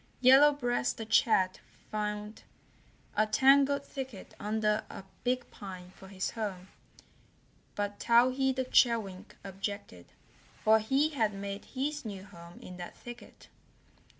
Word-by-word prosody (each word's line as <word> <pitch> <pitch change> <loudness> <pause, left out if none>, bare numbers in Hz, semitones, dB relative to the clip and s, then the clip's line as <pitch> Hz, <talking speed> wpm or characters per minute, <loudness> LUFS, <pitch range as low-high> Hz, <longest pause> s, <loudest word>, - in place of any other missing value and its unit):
Yellow 270 +3 +7
Breast 245 -4 -1
the 225 - -5
Chat 215 -4 +3 0.3
found 210 0 -4 0.7
a 215 - +3
tangled 275 +4 +4
thicket 265 -9 -8
under 210 0 0
a - - -8 0.2
big 250 0 -1
pine 185 -3 -9
for 190 - -14
his 190 -1 -3
home, 195 -4 -5 1.1
but 205 0 -3
Towhee 255 +3 +4
the 260 0 -1
Chewink 220 -6 +1
objected, 195 - -6 0.6
for 220 0 +6
he 270 +8 +2
had 225 -9 0
made 200 0 -6
his 290 +3 -3
new 200 -4 -7
home 170 -3 -13
in 180 - -10
that 175 -1 -8
thicket. 240 0 -12
215 Hz, 125 wpm, -31 LUFS, 195-255 Hz, 1.1 s, Yellow